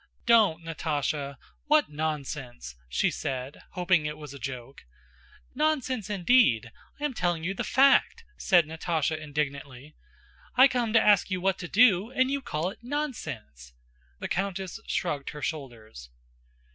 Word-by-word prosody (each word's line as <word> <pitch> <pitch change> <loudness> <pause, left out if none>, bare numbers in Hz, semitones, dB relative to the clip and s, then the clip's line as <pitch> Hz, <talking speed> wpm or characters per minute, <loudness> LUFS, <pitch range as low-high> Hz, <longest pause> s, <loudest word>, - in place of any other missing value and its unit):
"Don't, 210 -9 +4
Natásha! 150 -3 -2 0.3
What 300 - +3
nonsense!" 140 - -4
she 65 - +1
said, 130 +1 -5
hoping 180 -4 +2
it 150 0 -5
was 150 -2 -9
a 140 - -10
joke. 130 +1 -7 0.7
"Nonsense, 260 -7 0
indeed! 180 - +3 0.3
I - - -8
am 290 - -1
telling 175 -6 -1
you 185 +3 -1
the - - -3
fact," 275 +2 +4
said 175 -3 +3
Natásha 160 0 -1
indignantly. 145 -2 -5 0.6
"I 260 +2 +8
come 245 -4 -1
to 230 - +7
ask 205 -3 +4
you 185 -2 -1
what 190 +1 0
to 175 - -5
do, 210 -1 +4
and 260 +1 +1
you 280 0 -1
call 170 - -2
it - - -14
'nonsense!'" 155 - -5 0.4
The - - -5
countess 190 +1 -3
shrugged 145 -6 -2
her 150 - -8
shoulders. 115 - -6
165 Hz, 145 wpm, -27 LUFS, 140-220 Hz, 0.7 s, I